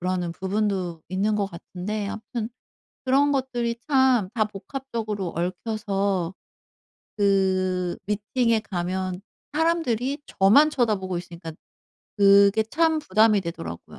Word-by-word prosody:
그러는 180 -1 -1
부분도 190 -3 -2
있는 195 +4 0
것 205 -1 0
같은데 195 +3 -5
아무튼 220 +2 -5 0.6
그런 275 +2 +3
것들이 245 -4 -1
참 260 -8 +4
다 220 -3 +2
복합적으로 215 -2 -5
얽혀서 195 0 -1 0.8
그 185 -3 +1
미팅에 225 +3 +1
가면 185 -1 -3 0.3
사람들이 295 -5 0
저만 275 +11 +5
쳐다보고 210 -9 0
있으니까 170 -2 -8 0.7
그게 200 +1 +6
참 320 +7 +2
부담이 215 -5 +3
되더라고요. 85 - -6
205 Hz, 260 characters per minute, -24 LUFS, 185-235 Hz, 0.8 s, 그게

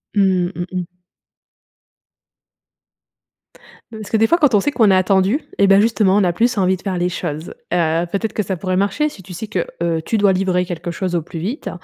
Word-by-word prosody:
Mmh, 190 -3 +2
mmh 175 - -3
mh. 180 -1 -5 3.0
Heu - - -7
parce 215 - -8
que 220 - +3
des 225 +1 +3
fois, 340 - +3
quand 290 -7 +3
on 205 - +5
sait 290 - 0
qu'on 225 -7 +3
est - - +5
attendu 190 +6 +2 0.2
eh 200 - +4
ben, 195 0 +6
justement, 210 -3 +3
on 205 - +3
a 175 - +1
plus 235 +5 +1
envie 190 -1 +2
de 185 - -13
faire 190 -3 -3
les 175 0 0
choses. 160 -2 -5 0.2
Heu, 165 -1 +1
peut-être 215 +2 -2
que 210 - -1
ça 190 -1 -3
pourrait 185 +1 -2
marcher 200 +11 +1
si 205 -10 -10
tu 180 - -10
sais 195 +6 -6
que, 185 -5 -2 0.2
heu, 165 -1 0
tu 225 - 0
dois 200 -2 +4
livrer 185 -1 0
quelque 175 -1 -5
chose 180 0 -3
au 170 - +1
plus 165 +1 -8
vite. 220 - -4
190 Hz, 225 wpm, -19 LUFS, 175-210 Hz, 3.0 s, ben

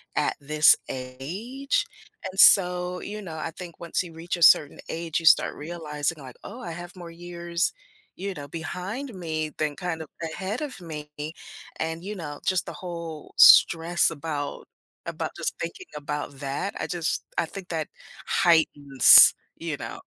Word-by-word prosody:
at - - 0
this 150 +2 +5
age, 175 - -3 0.5
and 190 - -8
so, 180 -2 +5
you 210 +1 -6
know, 170 -5 -8
I 160 +1 -4
think 170 0 -10
once 170 -1 -1
you 170 -2 -11
reach 170 +3 -4
a - - -9
certain 145 -3 +6
age, 165 -1 -2
you 165 - -8
start 155 - +5
realizing 155 -1 -4
like, 130 -3 -11
"Oh, 250 - -9
I 235 - -6
have 175 +2 -9
more 175 -2 -10
years, 170 0 -3 0.4
you 195 +2 -4
know, 145 -4 -8
behind 185 - -6
me 160 -4 -3
than 150 -2 -1
kind 175 -2 -4
of 160 - -8 0.2
ahead 190 - -4
of 280 -7 -6
me," 150 -3 -8 0.7
and, 160 +1 -3
you 210 +3 -5
know, 150 -6 -7
just 185 -2 +1
the - - -7
whole 170 -4 -8
stress 170 +1 +6
about 150 -2 -5 0.4
about - - -4
just - - -2
thinking 380 -2 -6
about 145 -1 -5
that, 140 +8 -3
I - - -3
just, 170 -2 -2
I - - +2
think 185 +3 -10
that 160 -3 -2 0.4
heightens, 145 -5 +6 0.2
you - - -4
know. - - -7
165 Hz, 165 wpm, -25 LUFS, 150-180 Hz, 0.7 s, certain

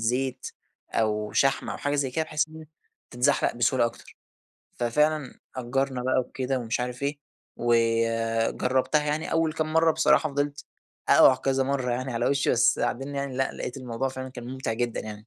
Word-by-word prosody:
زيت 125 +3 -1 0.4
أو 105 -1 0
شحم، 135 -1 +2
أو - - -4
حاجة 145 0 -2
زي 140 -2 0
كده 160 +5 -1
بحيث 155 0 -1
إن 155 - -13
هي 160 - -10 0.4
تتزحلق 125 +4 +1
بسهولة 120 +1 +2
أكتر، 115 - -10 0.6
ففعلًا 150 +4 0 0.2
أجرنا 130 0 -1
بقى 130 - +2
وكده 130 +1 -2
ومش 115 -1 -2
عارف 125 +2 -4
إيه، 145 +1 -2 0.4
وجربتها 115 +4 +1
يعني 150 +2 -2
أول 165 -1 +1
كام 155 0 -2
مرّة 160 0 +5
بصراحة 160 0 +3
فضلت 145 +1 -2 0.4
أقع 130 - +7
كذا 135 0 0
مرّة 130 -2 -1
يعني 130 +2 -2
على 115 +1 0
وشي 140 0 +1
بس 120 - +3
بعدين 135 +3 -2
يعني 140 -2 -3
لأ، 135 - +1
لاقيت 125 - -6
الموضوع 125 0 -3
فعلًا 130 0 -6
كان 125 -2 -9
ممتع 130 -2 -3
جدًا 120 0 -2
يعني. 110 - -6
130 Hz, 175 wpm, -26 LUFS, 120-145 Hz, 0.6 s, أقع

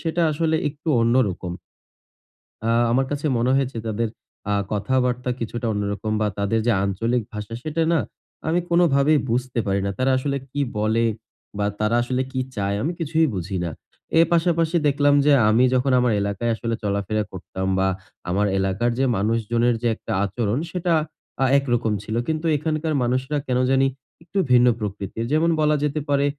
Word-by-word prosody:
সেটা 170 +1 -1
আসলে 160 +1 +1
একটু 150 +2 -8
অন্য 115 +1 +3
রকম। 90 -1 -5 1.1
আ - - +1 0.2
আমার 130 +2 +2
কাছে 145 +1 -2
মনে 125 +2 +2
হয়েছে 135 -3 -1
তাদের 115 +2 -1 0.4
আ - - +2 0.2
কথাবার্তা 125 +4 0
কিছুটা 120 +1 -4
অন্যরকম 105 +1 -2
বা 105 - +2
তাদের 100 +3 +1
যে - - +5
আঞ্চলিক 115 +5 0
ভাষা, 105 +1 -6
সেটা 155 +1 -2
না 160 - +3 0.5
আমি 170 +2 +2
কোনভাবেই 155 -4 +4
বুঝতে 125 +1 -1
পারি 100 0 +1
না। 100 - 0
তারা 130 +1 +2
আসলে 140 +1 -1
কি 145 - -1 0.2
বলে 110 +2 +2 0.5
বা 105 - 0
তারা 105 +2 +1
আসলে 130 +1 -1
কি 130 - -2 0.2
চায়? 100 0 -1
আমি 160 - 0
কিছুই 160 0 +2
বুঝি 95 +1 -3
না। 85 - -2 0.5
এ - - +9
পাশাপাশি 170 -1 +2
দেখলাম 145 0 +3
যে 150 - +5 0.2
আমি 115 +3 +4
যখন 130 +2 +2
আমার 125 -2 +2
এলাকায় 100 +4 -1
আসলে 115 0 -2
চলাফেরা 100 +1 -1
করতাম 95 0 -6
বা 95 - +2 0.4
আমার 100 +3 +1
এলাকার 95 +5 0
যে 135 - +3
মানুষজনের 115 +3 +1
যে 120 - +1
একটা - - -8
আচরণ, 110 +4 -1
সেটা 175 -1 0 0.5
আ - - +4
একরকম 120 -5 0
ছিল। 110 +2 -4
কিন্তু 160 +1 -2
এখানকার 155 +1 -1
মানুষেরা 130 +4 0
কেন 125 -1 +1
জানি 135 0 +4 0.4
একটু 180 +4 -7
ভিন্ন 125 0 +6
প্রকৃতির। 105 +1 -4
যেমন 165 +2 +3
বলা 150 0 +3
যেতে 150 +1 0
পারে 140 0 +3
120 Hz, 170 wpm, -23 LUFS, 105-145 Hz, 1.1 s, এ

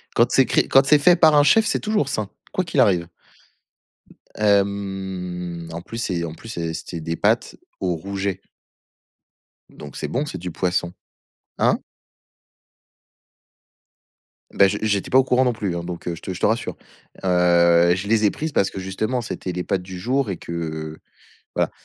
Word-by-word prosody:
quand - - +3
c'est - - +5
cré - - +1
quand 135 0 +5
c'est 150 +1 +5
fait 175 +5 +6
par 160 -3 +5
un 145 - +6
chef, 220 +9 +5
c'est - - 0
toujours 210 -10 0
sain, 110 -5 -2 0.2
quoi 185 - 0
qu'il 165 -5 -2
arrive. 90 -8 +3 1.3
Hem 95 -4 -1
en 85 +1 -6
plus 115 - -8
c'est 90 -7 -2
en 80 -2 -5
plus 115 - -12
c'est 85 -6 -3
c'était 85 +1 -6
des 80 +1 -3
pâtes - - +1 0.2
au 90 -2 -1
rouget. 95 +2 -4 1.3
Donc 75 -3 -11
c'est - - -4
bon, 140 +4 -1
c'est 120 - -6
du 90 0 -6
poisson. 90 0 -1 0.7
Hein? - - +3 2.8
Bah, 100 - +5
j'ai 100 +2 -2
j'étais 100 -3 -1
pas 130 - +6
au - - +4
courant 130 0 +2
non 125 - +2
plus, 100 -5 -3
hein, 85 - -4
donc 85 0 -7
heu, 85 - -2
je - - -13
te 95 - -4
je 90 - -8
te - - +1
rassure, 110 +2 -1 0.5
heu, 85 -1 +4
je 95 +2 -5
les 110 0 +3
ai 100 - +4
prises 160 +1 -4
parce 100 - +1
que - - -6
justement, 110 +7 -2
c'était 95 -4 -5
les 90 0 -3
pâtes 95 0 -1
du 90 0 -8
jour 125 +2 0
et 90 - -4
que 80 -2 -5 0.6
voilà. - - +1
95 Hz, 180 wpm, -22 LUFS, 85-115 Hz, 2.8 s, fait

